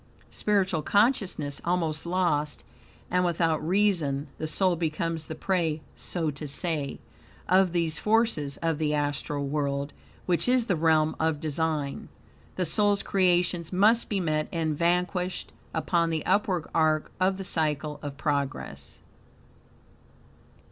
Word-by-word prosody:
Spiritual 190 -6 +1
consciousness 195 - +1
almost 165 -2 -1
lost, 170 -5 0 0.5
and 180 0 +3
without 165 -3 +1
reason, 165 -6 +1
the 155 - -2
soul 185 +3 +2
becomes 165 0 -2
the 160 - -5
prey, 170 -5 0 0.2
so 165 -4 -2
to 145 +1 -6
say, 150 -1 -2 0.5
of 185 0 +4
these 165 -3 0
forces 215 -11 +1
of 165 -2 0
the 150 -1 +1
astral 145 0 -1
world, 140 0 -2 0.3
which 180 +6 +1
is 250 -2 +3
the 195 - +1
realm 155 -1 +3
of 160 -2 +1
design. 155 -2 -2 0.5
The 185 - 0
soul's 205 +4 +2
creations 175 -3 +1
must 215 +5 +4
be 205 - 0
met 155 -3 0
and 160 -4 -1
vanquished 180 +2 0 0.2
upon 170 -2 +1
the 160 -2 -2
upward 185 -3 +1
arc 155 -1 +2
of 190 +1 +2
the 195 - -5
Cycle 150 -4 -1
of 145 -2 -6
Progress. 140 - -3
165 Hz, 130 wpm, -27 LUFS, 150-185 Hz, 0.5 s, of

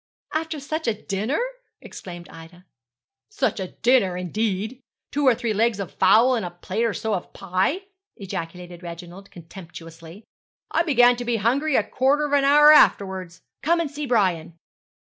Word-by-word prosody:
'After 315 -1 -3
such 310 +2 -4
a 215 -2 -1
dinner!' 215 - -2 0.4
exclaimed 175 -2 -10
Ida. 165 +2 -14 0.6
'Such 265 - -1
a 190 - -3 0.2
dinner, 235 -7 +3
indeed! 215 +6 -3 0.3
two 285 -1 0
or 250 - +5
three 235 -2 -2
legs 220 0 +1
of 195 -4 -6
fowls 225 +7 +4
and 225 - -3
a 175 - -4
plate 185 +6 -3
or 225 - 0
so 220 -1 -2
of 185 - -4
pie!' 190 - -1 0.3
ejaculated 175 -2 -7
Reginald, 175 +2 -10
contemptuously. 165 +1 -12 0.5
'I 330 - +2
began 245 -7 +4
to 245 - -5
be 235 0 0
hungry 260 +7 +1
a - - +3
quarter 280 +3 +1
of 290 - -4
an 280 -1 +3
hour 295 +2 +7
afterwards. 190 - +2 0.2
Come 335 +3 +2
and 320 -4 -2
see 295 0 -5
Brian.' 180 -8 0
215 Hz, 160 wpm, -23 LUFS, 180-270 Hz, 0.6 s, hour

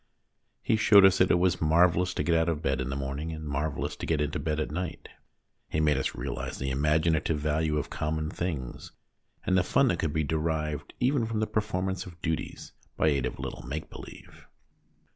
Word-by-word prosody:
He 110 - +2
showed 105 -2 +7
us 95 -1 +5
that 90 - +4
it - - +4
was 90 0 +1
marvellous 85 +3 +3
to - - 0
get 85 - +1
out 80 0 +3
of 80 -1 -2
bed 70 -3 0
in 65 - -3
the 70 - -2
morning, 70 +4 -4
and 80 -1 -6
marvellous 75 +1 -2
to - - -5
get 80 -3 +1
into 75 +3 -1
bed 75 -2 -1
at 75 - -2
night. 85 +1 -5 0.6
He 75 - -1
made 75 -1 +3
us 65 - -1
realise - - -4
the 65 0 -2
imaginative 75 +3 +1
value 75 +1 0
of 75 - -3
common 75 0 -2
things, 75 -9 -5 0.5
and 95 - +2
the 90 - +5
fun 130 +8 +3
that - - 0
could 80 - 0
be 80 +1 0
derived 75 -1 -2
even 125 -2 +2
from 110 -1 -2
the 110 - +1
performance 95 -4 -2
of 85 -1 -12
duties, 80 -1 -4 0.3
by 80 - +3
aid 70 -4 +1
of - - -7
a - - -7
little - - -5
make 70 +5 -6
believe. - - -12
80 Hz, 210 wpm, -28 LUFS, 75-90 Hz, 0.6 s, showed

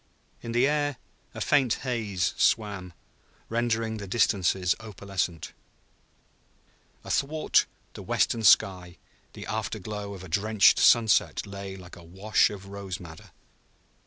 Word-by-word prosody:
In 115 - -6
the 120 +2 +3
air 145 -2 0 0.4
a - - -6
faint 135 -6 +2
haze 105 -8 -1
swam, 100 -5 0 0.6
rendering 115 -1 -1
the 100 -2 -7
distances 95 -3 +1
opalescent. 95 -6 -4 1.5
Athwart 155 +3 +1 0.3
the - - -9
western 115 - 0
sky 90 -4 +3 0.4
the - - -9
after - - -3
glow 105 0 -6
of 95 - -11
a - - -9
drenched 100 +4 +3
sunset 115 -3 +4
lay 100 -1 -8
like 90 0 -12
a 85 - -13
wash 95 +6 +1
of 100 -2 -9
rose 100 -2 -7
madder. 80 -3 -12
100 Hz, 125 wpm, -27 LUFS, 95-115 Hz, 1.5 s, sunset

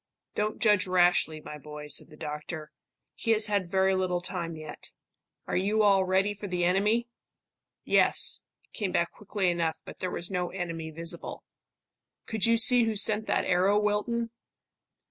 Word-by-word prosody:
"Don't 210 +1 -1
judge 210 -4 +3
rashly, 175 -3 +3
my 150 - -9
boy," 150 0 -9
said 145 +2 0
the 150 - -15
doctor. 150 +1 -6 0.4
"He - - -5
has 215 0 +1
had 200 -4 -1
very 190 +1 +3
little 185 -1 0
time 175 -2 -4
yet. 155 -1 -8 0.5
Are - - -3
you 205 +4 +2
all 195 -2 +4
ready 190 +2 +2
for 205 0 -7
the 180 -2 -1
enemy?" 210 +7 +2 0.8
"Yes," - - +3 0.3
came 200 -4 -2
back 170 -1 +1
quickly 200 -3 -1
enough; 165 -2 -1
but - - -10
there 185 - -2
was 175 +1 -3
no 180 -1 -1
enemy 165 -3 -5
visible. 165 +1 -4 0.8
"Could 220 -1 -1
you 230 0 +4
see 240 +1 +5
who 225 -1 -1
sent 210 +1 +2
that - - +1
arrow, 185 +3 +3
Wilton?" 220 +3 -1
185 Hz, 165 wpm, -28 LUFS, 170-210 Hz, 0.8 s, see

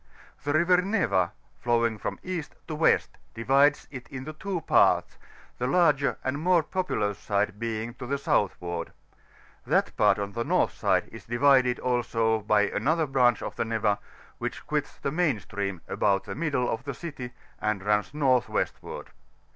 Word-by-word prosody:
The 145 +1 0
River 175 +3 +4
Neva, 180 - +1 0.3
flowing 115 -2 +1
from - - -4
East 175 -5 -5
to 160 - -4
West, 155 +1 +2 0.2
divides 140 +5 +3
it 130 -3 -8
into 135 +3 -7
two 185 +2 -4
parts, - - +3 0.4
the 125 - 0
lai|^ar 150 -3 +3
and 130 +2 -2
more 175 0 +3
populous 145 - -2
side 105 0 -1
being 115 0 -3
to 125 - -6
the 140 +2 0
southward; 85 -9 -1 0.7
that - - +1
part - - +4
on 100 0 -3
the 115 +3 -2
north - - +2
side - - +1
is - - -11
divi&d 125 +1 +4
also 115 -3 +1
by 105 -1 +2
anotner 155 0 0
branch 125 -4 +3
of - - -5
the - - +1
Neva, 110 -2 0 0.4
which - - -5
quits - - -2
the 140 - -3
main 155 -7 +1
stream 100 -4 -4
about 100 -2 +1
the 100 - -6
middle 140 -4 0
of 115 - -2
the 140 0 -4
citv, 140 -4 -7 0.3
and 105 -3 -1
runs 105 -1 +1
north 135 -4 +2
westward. - - -4
125 Hz, 165 wpm, -27 LUFS, 110-150 Hz, 0.7 s, River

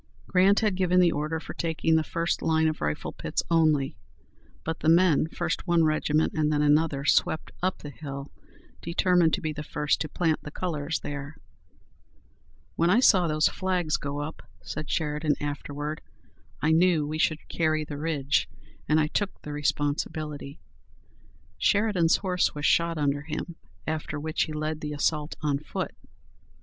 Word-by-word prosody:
Grant 190 +2 +4
had 215 -3 +2
given 180 -1 +2
the 175 -2 +5
order 155 +2 -2
for - - -8
taking 165 -1 0
the 160 - +3
first 170 +2 -1
line 160 0 +2
of 155 - -2
rifle 75 0 -2
pits - - -2
only, 155 -6 +3 0.7
but 160 0 -3
the 155 - +2
men, 165 -3 +5
first 170 +2 -3
one 170 -1 +4
regiment 155 0 +1
and 155 -1 +1
then 150 -1 +2
another, 150 -1 +2
swept 155 - +2
up 185 +1 0
the 145 - -6
hill, 140 0 -7 0.5
determined 170 0 +3
to 190 - -7
be 155 -2 -2
the 150 - -6
first 150 -1 -1
to 155 - -2
plant 165 -3 0
the - - -7
colors 155 -2 -3
there. 145 +1 -6 1.4
"When 170 +1 +2
I 210 +6 +5
saw 190 -8 +5
those 155 0 +3
flags 180 -4 0
go 140 +1 -4
up," 150 +2 -6 0.2
said 155 -1 -5
Sheridan 150 -2 0
afterward, 145 +1 -4 0.6
"I 155 - +3
knew 165 -2 +4
we 155 +1 -4
should 155 0 0
carry 155 -2 0
the 145 -1 -7
ridge, 145 -3 0 0.4
and 155 +1 +4
I 155 - +3
took 195 +6 -2
the 150 - -6
responsibility." 145 0 -2 1.0
Sheridan's 200 -6 +3
horse 180 -5 0
was 145 0 -3
shot 170 -1 +3
under 145 -1 0
him, 160 +2 -5 0.3
after 155 -1 -3
which 155 +1 0
he - - -8
led 155 0 -3
the 150 -1 -4
assault 150 +1 -1
on 145 -2 +1
foot. 150 - -4
155 Hz, 165 wpm, -27 LUFS, 150-170 Hz, 1.4 s, the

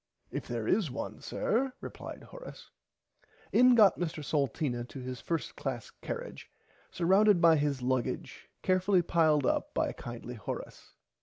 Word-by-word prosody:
If - - -4
there 115 -2 -3
is 195 -6 +2
one 130 - -6
sir 255 +4 0
replied - - -8
Horace. - - -11 0.8
In 250 0 +6
got 210 -6 +6
Mr 160 -3 -3
Salteena 140 -4 0
to 135 - -9
his 125 -1 -6
first 165 -3 -3
class 130 -5 -4
carrage - - -6 0.4
surrounded 190 +3 +4
by 165 -1 +6
his 145 -3 0
luggage 130 -2 -2
carefully 185 0 +3
piled 155 -4 +3
up - - 0
by - - +1
kindly 120 0 -7
Horace. 110 -5 -7
155 Hz, 140 wpm, -31 LUFS, 130-185 Hz, 0.8 s, In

